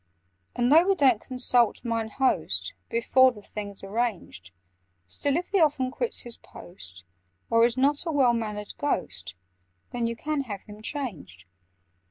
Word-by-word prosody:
"And, 245 +1 +2
though 330 +4 +7
we 390 - +4
don't 260 - +4
consult 250 -2 +1
'Mine 230 -1 -1
Host' 265 - 0 0.2
Before 260 +3 +4
the 210 -4 -13
thing's 205 -2 -7
arranged, 195 - -3 0.6
Still, 280 - -1
if 350 - -4
he 400 - +2
often 275 -5 +2
quits 470 - -2
his 240 -1 -6
post, 95 - -12 0.5
Or 230 0 +5
is 240 +1 0
not 285 +5 +1
a - - 0
well 265 -5 +4
mannered 210 -3 -4
Ghost, 95 - -2 0.6
Then 240 -1 -1
you 235 - -3
can 295 +4 -2
have 205 -5 -6
him 210 0 -12
changed. 180 - -6
235 Hz, 155 wpm, -26 LUFS, 210-275 Hz, 0.6 s, though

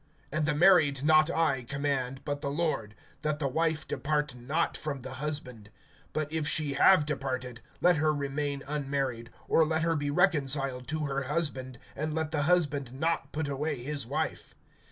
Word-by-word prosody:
(10)And 155 0 +1
the 150 -1 +1
married 155 -5 +5
not 155 +1 +5
I 160 -6 +1
command, 135 0 -2
but 145 -1 -3
the 140 - -2
Lord, 140 -9 -2 0.3
that 150 -1 -1
the 145 -2 -1
wife 160 +2 0
depart 150 -1 -1
not 140 +7 -1
from 140 -4 -4
the 130 +1 -7
husband. 125 -8 -4 0.5
(11)But 155 -1 0
if 160 -2 -1
she 150 -3 +2
have 155 +2 +5
departed, 130 -4 -4 0.2
let 175 -2 +5
her 155 +1 +3
remain 140 -1 -2
unmarried, 135 -5 -2 0.2
or 165 - +4
let 160 +1 0
her 165 0 +2
be 145 -1 -1
reconciled 140 -6 +2
to 155 +1 -2
her 140 -1 -2
husband; 135 -4 -2 0.2
and 155 +1 -3
let 160 -1 -2
the 150 -2 0
husband 145 -7 +1
not 150 0 -1
put 155 -1 -2
away 140 -2 -2
his 140 -3 -3
wife. - - -3
145 Hz, 175 wpm, -29 LUFS, 135-155 Hz, 0.5 s, married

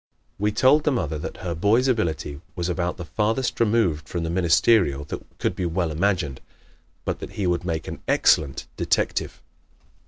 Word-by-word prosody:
We 105 +1 +1
told 130 +7 +4
the 150 - +2
mother 80 - -1
that - - -6
her 85 - -1
boy's 105 +10 +3
ability 85 - -1
was 85 -1 -2
about 90 0 -1
the 85 - -6
farthest 115 +8 -1
removed 105 -9 +1
from 85 -2 -2
the 80 - -2
ministerial 85 -3 +3
that 75 - -6
could - - -2 0.2
well 90 -3 +1
be - - -4
imagined, 85 -6 0 0.6
but - - -2
that - - -8
he 100 - -2
would 90 -1 +1
make 80 -3 -3
an - - -6
excellent 70 -4 +3
detective. - - -1
90 Hz, 175 wpm, -24 LUFS, 80-110 Hz, 0.6 s, told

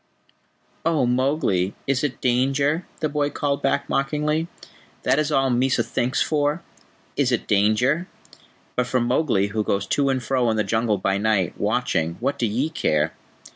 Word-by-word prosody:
"Oh, 155 -5 +2
Mowgli, 125 - +1
is 135 0 0
it 145 -3 -2
danger?" 135 +6 +1
the 155 - +2
boy 145 -1 0
called 145 -1 -2
back 140 0 0
mockingly. 150 +3 0 0.6
"That 130 +3 +2
is 150 0 0
all 135 -2 +2
Mysa 125 0 +2
thinks 125 +3 0
for: 150 +2 0 0.5
Is 135 -3 +1
it 120 - 0
danger? 110 - +2 0.7
But 125 -1 0
for 130 0 +1
Mowgli, 120 -5 +1
who 110 +1 -1
goes 100 -1 -1
to 140 +7 +1
and 130 -2 0
fro 125 -1 +1
in 110 - 0
the 105 - +2
Jungle 110 -2 0
by 95 +1 0
night, 105 -4 +1
watching, 105 -7 0
what 140 - -1
do 120 - +1
ye 130 +9 -1
care?" 75 - 0
130 Hz, 165 wpm, -23 LUFS, 110-145 Hz, 0.7 s, Oh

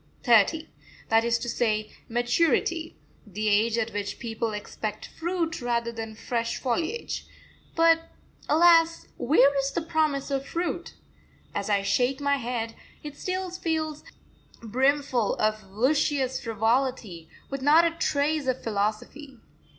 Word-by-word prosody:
thirty 245 +7 +4 0.4
that 225 0 +4
is 235 0 +2
to 235 - -6
say 215 -3 0 0.2
maturity 315 +7 +1 0.3
the 210 +2 -3
age 220 +3 +3
at 230 0 -1
which 205 0 -3
people 230 -1 -3
expect 210 0 -5
fruit 335 -2 -3
rather 235 -1 -1
than 225 -1 -6
fresh 230 +1 -2
foliage. 330 - -2 0.5
But, 330 0 +4 0.4
alas, 330 +1 +5
where 275 +2 +4
is 275 0 -1
the 340 - -2
promise 310 -4 0
of 275 -1 0
fruit? 340 +5 -4 0.6
As - - -3
I 200 -1 +2
shake 255 +6 +1
my 280 0 +1
head, 230 -2 -3 0.3
it 295 -1 -7
still 370 +1 -3
feels 320 -4 -2 0.6
brimful 260 0 +1
of 215 -1 -1
luscious 265 +4 +1
frivolity, 225 -6 -1 0.2
with 275 -1 -4
not 305 +5 +6
a 335 - +2
trace 300 -2 0
of 255 0 -1
philosophy. 220 +6 -3
260 Hz, 130 wpm, -26 LUFS, 225-310 Hz, 0.6 s, not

